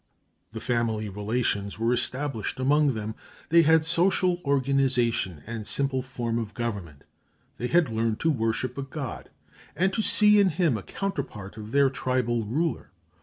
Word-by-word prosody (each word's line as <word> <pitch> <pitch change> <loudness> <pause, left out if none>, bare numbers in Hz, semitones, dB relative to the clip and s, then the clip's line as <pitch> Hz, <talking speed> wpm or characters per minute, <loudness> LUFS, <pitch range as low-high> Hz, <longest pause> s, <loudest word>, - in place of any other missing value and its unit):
The 110 - -6
family 115 -3 -1
relations 105 -1 -2
were 115 +2 +1
established 125 0 -3
among 140 0 +3
them; 110 0 -4 0.4
they 170 +1 +6
had 160 0 +4
some 170 +2 +4
social 180 -2 +1
organization 130 - +1
and 115 -2 -6
simple 135 -2 0
form 120 -3 -3
of 110 -2 -6
government; 100 -12 -5 0.6
they 125 - -1
had 170 +2 +3
learned 110 0 -1
to 160 - +3
worship 120 +1 -1
a - - -1
god, 135 -1 -6 0.5
and 190 +4 +1
to 220 - 0
see 210 -1 +5
in 200 -2 +5
him 165 -5 +1
a 105 - -4
counterpart 120 - -5
of 105 -1 -8
their 140 0 +4
tribal 125 -3 -1
ruler. 155 +10 -2
125 Hz, 160 wpm, -26 LUFS, 110-150 Hz, 0.6 s, they